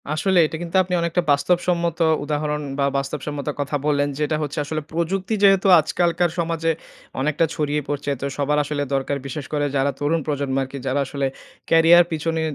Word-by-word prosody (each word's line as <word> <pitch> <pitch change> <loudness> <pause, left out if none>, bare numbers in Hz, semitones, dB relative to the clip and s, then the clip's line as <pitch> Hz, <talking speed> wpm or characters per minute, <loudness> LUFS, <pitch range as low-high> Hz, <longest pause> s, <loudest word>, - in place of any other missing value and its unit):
আসলে 175 +5 +2
এটা 160 - -4
কিন্তু 175 +1 -6
আপনি 180 0 -5
অনেকটা 170 +1 0
বাস্তবসম্মত 170 +3 +1 0.2
উদাহরণ 150 0 -2 0.2
বা 140 - +3
বাস্তবসম্মত 140 +1 -4
কথা 145 +1 -2
বললেন, 145 -1 +1
যে - - -5
এটা 155 - 0
হচ্ছে 150 +1 -4
আসলে 155 +1 -3
প্রযুক্তি 185 +5 -1
যেহেতু 195 -1 +5
আজকালকার 175 +2 +1
সমাজে 165 -1 0 0.5
অনেকটা 150 +3 +1
ছড়িয়ে 150 -1 -1
পড়ছে, 145 0 -2
তো - - -2
সবার 145 +1 +1
আসলে 145 0 -2
দরকার। 135 +1 -1
বিশেষ 140 +1 -5
করে 145 -1 +1
যারা 140 +1 +2
তরুণ 150 +3 +1
প্রজন্ম 140 -2 -1
আরকি 135 +1 -7
যারা 130 +2 0
আসলে 140 0 -2 0.4
ক্যারিয়ার 165 +1 +6
পিছনে 160 +1 -1
150 Hz, 170 wpm, -22 LUFS, 145-170 Hz, 0.5 s, ক্যারিয়ার